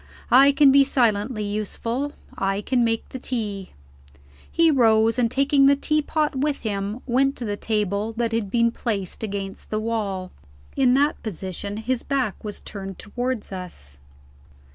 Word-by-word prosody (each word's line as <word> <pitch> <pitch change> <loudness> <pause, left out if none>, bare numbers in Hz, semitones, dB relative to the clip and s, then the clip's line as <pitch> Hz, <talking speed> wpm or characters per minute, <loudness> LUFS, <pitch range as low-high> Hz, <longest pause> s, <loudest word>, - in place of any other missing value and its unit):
I 270 +3 +8
can 280 -1 +6
be 275 +1 +7
silently 230 -4 +1
useful; 230 +6 -3 0.2
I 195 +1 -1
can 245 +3 +1
make 225 -1 0
the 260 - -7
tea." 210 -7 -4 0.8
He 330 -1 +4
rose, 225 -3 +4
and, 235 -2 +3
taking 275 +2 +3
the 280 - +6
teapot 305 +1 0
with 285 +1 -1
him, 205 +1 -3
went 270 +2 +2
to 240 - -5
the 205 -1 -2
table 210 0 -1
that 230 0 -1
had 225 -3 -1
been 235 +2 +2
placed 205 -7 -3
against 200 -2 -5
the 215 - -1
wall. 205 -5 -3 0.4
In 255 -2 +4
that 290 +2 +2
position, 200 0 -5
his 240 +3 -1
back 265 -7 -2
was 210 -1 -6
turned 195 -2 -7
towards 245 +1 -4
us. 170 - -8
225 Hz, 155 wpm, -23 LUFS, 205-265 Hz, 0.8 s, I